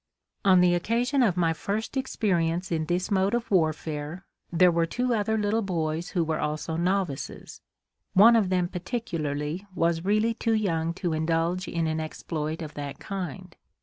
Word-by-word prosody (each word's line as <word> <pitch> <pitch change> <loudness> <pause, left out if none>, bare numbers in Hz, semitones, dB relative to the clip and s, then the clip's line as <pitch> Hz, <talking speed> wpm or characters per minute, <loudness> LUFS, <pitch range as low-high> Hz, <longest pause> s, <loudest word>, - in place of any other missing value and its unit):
On 185 -3 +6
the 180 0 +4
occasion 235 +9 +1
of 195 -8 +2
my 165 -2 +2
first 210 - -3
experience 180 -9 0
in 160 -2 0
this 180 +5 -1
mode 195 +3 +2
of 240 -2 -3
warfare, 155 0 -1 0.3
there 175 +1 +5
were 165 0 +1
two 250 +7 0
other 220 0 +1
little 210 +1 +1
boys 165 -4 -2
who 175 -3 0
were 160 -1 -1
also 155 +1 -2
novices. 180 -4 -2 0.5
One 225 +5 +8
of 210 -5 +3
them 180 -1 +1
particularly 170 -4 -3
was 165 -1 +1
really 215 +4 +2
too 225 0 0
young 170 -6 0
to 175 -3 -2
indulge 165 +3 0
in 170 -1 -1
an 160 0 -1
exploit 155 0 -4
of 150 - -8
that 145 -1 -6
kind. 185 -2 -6
175 Hz, 165 wpm, -27 LUFS, 160-200 Hz, 0.5 s, One